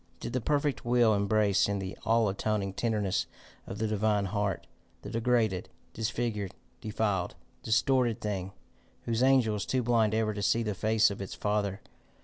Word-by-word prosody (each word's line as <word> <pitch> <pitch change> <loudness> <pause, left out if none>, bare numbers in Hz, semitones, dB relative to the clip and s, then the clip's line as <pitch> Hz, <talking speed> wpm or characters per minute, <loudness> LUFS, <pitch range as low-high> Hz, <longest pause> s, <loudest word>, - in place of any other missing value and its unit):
Did 120 - -6
the 130 - 0
perfect 145 +2 0
will 120 -2 +4
embrace 100 -1 +2
in 100 - 0
the 95 -1 -5
all 115 -1 +3
atoning 100 0 -1
tenderness 105 -4 0 0.4
of - - -6
the 110 - -1
divine 105 -1 +1
heart, 100 0 -2 0.4
the 100 - -7
degraded, 115 -5 +1 0.2
disfigured, 110 -3 -2 0.3
defiled, 105 -5 -1 0.3
distorted 120 0 +2
thing, 100 -3 -3 0.5
whose 115 0 -1
angel 130 -5 +4
is 105 - -3
too 130 -1 0
blind 115 -2 +2
ever 110 -1 +1
to 100 - -5
see 115 +3 +2
the 105 -2 -1
face 110 +2 +3
of 100 - -6
its 95 - -6
Father? 105 -2 -1
110 Hz, 160 wpm, -29 LUFS, 100-115 Hz, 0.5 s, will